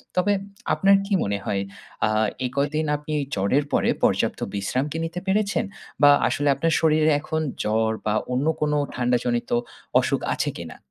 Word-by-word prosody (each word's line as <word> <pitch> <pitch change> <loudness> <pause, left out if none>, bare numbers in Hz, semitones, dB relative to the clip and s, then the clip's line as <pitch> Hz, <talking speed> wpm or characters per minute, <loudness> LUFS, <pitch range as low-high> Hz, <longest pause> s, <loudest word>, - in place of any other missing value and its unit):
তবে 195 +3 +3 0.4
আপনার 195 0 +5
কি 200 - -2
মনে 100 0 -1
হয়, 100 - -1 0.5
আ - - 0 0.4
এ - - +1
কয়দিন 145 +3 0
আপনি 150 +1 -6 0.2
জ্বরের 100 +9 +2
পরে, - - +2
পর্যাপ্ত - - +2 0.2
বিশ্রাম 115 +7 -1
কি 160 - -3
নিতে 165 +2 -4
পেরেছেন? 205 +2 +1 0.4
বা 145 - +8 0.2
আসলে 145 - -1
আপনার 165 +3 0
শরীরে 155 0 +3
এখন 160 0 -2 0.2
জ্বর 110 +1 +1
বা 105 - +1 0.2
অন্য 130 +4 0 0.2
কোন 150 -1 +1 0.2
ঠান্ডাজনিত 120 -1 0 0.5
অসুখ - - 0
আছে - - -1
কিনা? 80 -2 -8
145 Hz, 160 wpm, -24 LUFS, 115-160 Hz, 0.5 s, বা